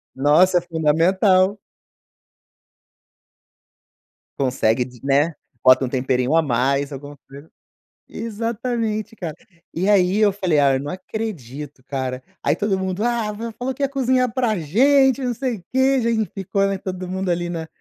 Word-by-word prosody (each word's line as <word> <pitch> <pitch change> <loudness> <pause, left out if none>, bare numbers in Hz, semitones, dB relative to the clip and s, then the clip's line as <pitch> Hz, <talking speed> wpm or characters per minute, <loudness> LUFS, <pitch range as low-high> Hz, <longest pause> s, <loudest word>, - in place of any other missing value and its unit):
Nossa 155 +7 +4
é - - +2
fundamental. 185 +4 +2 2.8
Consegue, 125 -2 +1 0.2
né, 145 +4 +2 0.3
bota 130 +1 +6
um - - -4
temperinho 130 +2 0
a 165 - +5
mais 140 +1 0
alguma 145 +1 -8
coisa, 140 +1 -11 0.7
exatamente, 225 0 -3
cara 165 -6 -5 0.4
e 185 +5 0
aí 190 -1 +3
eu 210 -2 +4
falei 180 -7 +1
"Ah, 140 -1 +4
eu - - -1
não 145 +1 -5
acredito 150 - -6
cara" 130 -2 -4 0.2
aí - - +2
todo 205 -2 0
mundo 190 +1 -3
"Ah, 235 -3 0
você 225 +2 -6
falou 260 +2 -3
que 280 - -10
ia 275 - +3
cozinhar 255 -3 +1
para 235 -7 0
gente 265 - +3
não 245 -1 0
sei 250 -2 -3
o 175 - -16
que," 265 0 +3
já 235 - 0 0.3
ficou, 195 +1 0
né, 195 -1 -1
todo 185 -1 -6
mundo 190 0 -3
ali 175 0 -1
na 165 -2 -5
185 Hz, 150 wpm, -21 LUFS, 145-225 Hz, 2.8 s, bota